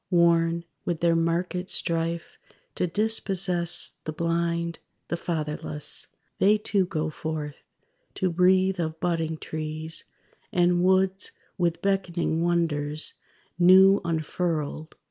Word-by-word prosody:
Worn 170 Hz, -1 st, +3 dB, 0.2 s
with 170 Hz, -2 st, -2 dB
their 170 Hz, -1 st, +3 dB
market 175 Hz, +2 st, -1 dB
strife 165 Hz, 0 st, -2 dB, 0.3 s
to 180 Hz, -, 0 dB
dispossess 185 Hz, -3 st, 0 dB
The 155 Hz, -, -2 dB
blind, 170 Hz, +1 st, -1 dB, 0.3 s
the -, -, 0 dB
fatherless, 150 Hz, -3 st, -3 dB, 0.3 s
They 210 Hz, +2 st, +5 dB
too 200 Hz, -3 st, 0 dB
go 155 Hz, -3 st, -2 dB
forth, 155 Hz, -2 st, -5 dB, 0.6 s
to 185 Hz, -2 st, 0 dB
breathe 185 Hz, +2 st, +3 dB
of 160 Hz, -1 st, -2 dB
budding 165 Hz, -2 st, -1 dB
trees, 155 Hz, +1 st, -5 dB, 0.5 s
And 175 Hz, 0 st, +3 dB
woods 190 Hz, +1 st, +2 dB, 0.2 s
with 170 Hz, -2 st, -1 dB
beckoning 175 Hz, -4 st, 0 dB
wonders 155 Hz, -3 st, 0 dB, 0.5 s
new 190 Hz, +2 st, +7 dB
unfurled. 160 Hz, -1 st, -2 dB
170 Hz, 105 wpm, -26 LUFS, 160-180 Hz, 0.6 s, new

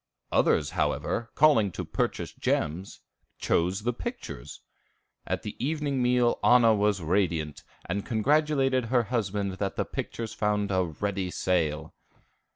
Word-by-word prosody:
Others, -, -, +2 dB
however, 115 Hz, 0 st, -1 dB
calling 140 Hz, -10 st, +5 dB
to -, -, -4 dB
purchase -, -, -2 dB
gems, 85 Hz, +6 st, -2 dB, 0.4 s
chose 90 Hz, +4 st, 0 dB
the 120 Hz, +2 st, 0 dB
pictures. -, -, -7 dB, 0.7 s
At -, -, -2 dB
the 105 Hz, -, -6 dB
evening 145 Hz, -2 st, -1 dB
meal 125 Hz, -1 st, +2 dB
Anna 120 Hz, -2 st, +6 dB
was 105 Hz, -3 st, +1 dB
radiant, 80 Hz, -4 st, 0 dB, 0.2 s
and 100 Hz, +3 st, -2 dB
congratulated 135 Hz, +1 st, +2 dB
her 120 Hz, +1 st, +2 dB
husband 100 Hz, -4 st, -1 dB
that 100 Hz, -1 st, -2 dB
the -, -, -1 dB
pictures 115 Hz, -1 st, -5 dB
found 105 Hz, -1 st, 0 dB
a 95 Hz, -1 st, +2 dB
ready 95 Hz, +3 st, -3 dB
sale. 80 Hz, -4 st, -1 dB
105 Hz, 130 wpm, -27 LUFS, 95-125 Hz, 0.7 s, Anna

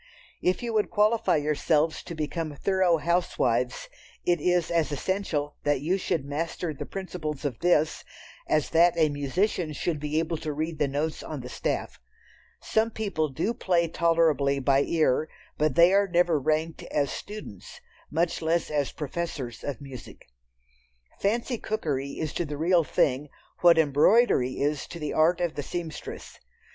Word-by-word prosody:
If 180 Hz, +5 st, +1 dB
you 235 Hz, -1 st, -2 dB
would 215 Hz, -1 st, +1 dB
qualify 215 Hz, 0 st, +3 dB
yourselves 150 Hz, +1 st, +1 dB
to 170 Hz, -, -6 dB
become 155 Hz, 0 st, -3 dB
thorough 185 Hz, +1 st, +2 dB
housewives, 175 Hz, -, 0 dB, 0.4 s
it 175 Hz, -3 st, +2 dB
is 175 Hz, -1 st, +1 dB
as 165 Hz, -3 st, +1 dB
essential 150 Hz, -2 st, -2 dB
that 145 Hz, -2 st, +1 dB
you 180 Hz, +6 st, 0 dB
should 160 Hz, -6 st, -1 dB
master 160 Hz, +3 st, -3 dB
the 140 Hz, -, -7 dB
principles 160 Hz, -6 st, -5 dB
of 130 Hz, -5 st, -2 dB
this, 160 Hz, -3 st, +2 dB, 0.5 s
as 155 Hz, -2 st, +1 dB
that 170 Hz, +1 st, +4 dB
a 160 Hz, -2 st, +4 dB
musician 155 Hz, +4 st, -1 dB
should 155 Hz, +1 st, -2 dB
be 150 Hz, +1 st, -2 dB
able 165 Hz, 0 st, 0 dB
to 155 Hz, -1 st, -4 dB
read 155 Hz, +1 st, -3 dB
the 145 Hz, -, +2 dB
notes 150 Hz, +3 st, -2 dB
on 150 Hz, -4 st, -6 dB
the 125 Hz, -, -8 dB
staff. -, -, -3 dB, 0.6 s
Some 220 Hz, +1 st, +1 dB
people 200 Hz, -9 st, -2 dB
do 195 Hz, -, -1 dB
play 175 Hz, -6 st, +1 dB
tolerably 160 Hz, -4 st, +2 dB
by 135 Hz, 0 st, +3 dB
ear, 155 Hz, -1 st, +1 dB, 0.3 s
but 150 Hz, -3 st, +2 dB
they 170 Hz, +2 st, +6 dB
are 200 Hz, 0 st, +4 dB
never 175 Hz, -3 st, +2 dB
ranked 155 Hz, +3 st, -1 dB
as 140 Hz, -2 st, 0 dB
students, 205 Hz, -, -8 dB, 0.3 s
much 165 Hz, +2 st, 0 dB
less 165 Hz, 0 st, 0 dB
as 145 Hz, -2 st, 0 dB
professors 150 Hz, -6 st, -5 dB
of 145 Hz, -2 st, -4 dB
music. 135 Hz, -3 st, -10 dB, 0.9 s
"Fancy" 230 Hz, +4 st, 0 dB
cookery 140 Hz, -10 st, -2 dB
is 155 Hz, -2 st, -4 dB
to -, -, -1 dB
the 145 Hz, -1 st, -5 dB
real 170 Hz, +2 st, +3 dB
thing 145 Hz, 0 st, +1 dB, 0.3 s
what 170 Hz, -2 st, +6 dB
embroidery 150 Hz, -, +4 dB
is 145 Hz, 0 st, -1 dB
to -, -, -8 dB
the 150 Hz, -3 st, -4 dB
art 165 Hz, +3 st, +3 dB
of 175 Hz, -2 st, -1 dB
the 145 Hz, -, -3 dB
seamstress. 165 Hz, +2 st, -7 dB
160 Hz, 160 wpm, -27 LUFS, 145-175 Hz, 0.9 s, they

